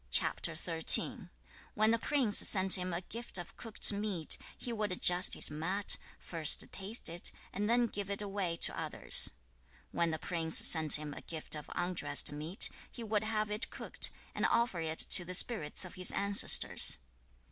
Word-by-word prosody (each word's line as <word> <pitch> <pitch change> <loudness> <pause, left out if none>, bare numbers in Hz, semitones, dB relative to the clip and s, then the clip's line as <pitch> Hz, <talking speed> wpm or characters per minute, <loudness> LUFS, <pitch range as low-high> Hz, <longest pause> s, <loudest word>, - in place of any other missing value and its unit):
When 215 +1 0
the 230 - -2
prince 255 -6 +2
sent 190 -2 +5
him 185 0 -6
a 170 +1 -6
gift 235 +1 -7
of 175 -1 -11
cooked 225 -2 +9
meat, 200 -6 -2 0.2
he 240 - -8
would 210 -3 -5
adjust 180 0 +1
his - - +2
mat, 180 +7 -2 0.2
first 160 -3 -1
taste 200 +5 -3
it, 170 +1 -1 0.2
and 210 +2 -5
then 240 +1 0
give 205 -3 -8
it 200 - -6
away 195 -4 -5
to - - -5
others. - - +3 0.6
When 170 -1 -3
the 160 - -5
prince 160 0 +3
sent 160 -3 +4
him 150 -1 -4
a - - -12
gift 160 -2 -9
of 150 -1 -5
undressed 175 -3 0
meat, 155 +6 -3 0.2
he 235 - -11
would 215 -1 -4
have 215 -1 -5
it 210 +3 -4
cooked, - - -3 0.2
and - - -3
offer 235 -7 -3
it 160 -1 -7
to 175 - +3
the 180 +1 -7
spirits 185 -6 -3
of 180 - -13
his 185 0 0
ancestors. 200 0 0
190 Hz, 170 wpm, -30 LUFS, 170-215 Hz, 0.6 s, cooked